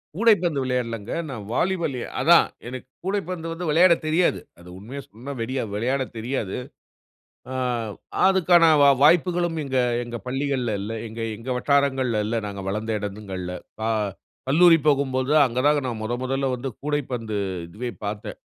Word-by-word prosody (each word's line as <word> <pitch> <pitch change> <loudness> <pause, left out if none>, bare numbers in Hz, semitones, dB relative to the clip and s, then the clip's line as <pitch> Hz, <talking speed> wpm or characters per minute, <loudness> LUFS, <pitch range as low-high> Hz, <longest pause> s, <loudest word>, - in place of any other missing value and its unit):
கூடைப்பந்து 185 -8 +3
விளையாடலங்க. 115 -4 -2 0.2
நான் 110 -6 -6
வாலிபாலு 170 -8 0 0.2
அதான், - - +6 0.2
எனக்கு 130 0 -7 0.2
கூடைப்பந்து 185 -4 -2
வந்து 170 0 -5
வெளையாடத் 170 +2 +5
தெரியாது. 160 - +2 0.2
அது 85 +1 -13
உண்மையா 120 +9 -7
சொன்னா, 125 +7 -8
வெடிய 130 +3 -2
வெளையாடத் 130 +4 -1
தெரியாது. 110 -4 -3 1.0
அம் 120 -5 -2 0.3
அதுக்கான 180 -3 +5 0.2
வா 140 - +8
வாய்ப்புகளும் 175 +1 +3
இங்க, 135 -1 -1 0.3
எங்க 120 0 -6
பள்ளிகள்ல 130 -3 -1
இல்ல. 105 +3 -5 0.2
எங்க 115 +1 -7 0.2
எங்க 120 +3 -8
வட்டாரங்கள்ல 130 -5 +1
இல்ல, 115 +2 -2
நாங்க 100 -1 -6
வளர்ந்த 110 +2 -2
எடங்கள்ல. 95 -3 -5 0.3
கா 110 - 0 0.6
கல்லூரி 165 +3 +7
போகும்போது 135 -2 +1
அங்க 125 -1 -2
தாங்க 150 0 +4
நான் 115 -3 -4
1 120 +3 -3
1ல 135 +1 -1
வந்து 130 +2 -4
கூடைப்பந்து 125 -7 -2 0.3
இதுவே 115 +8 -5 0.2
பார்த்தேன். 105 0 -5
130 Hz, 140 wpm, -24 LUFS, 115-150 Hz, 1.0 s, வா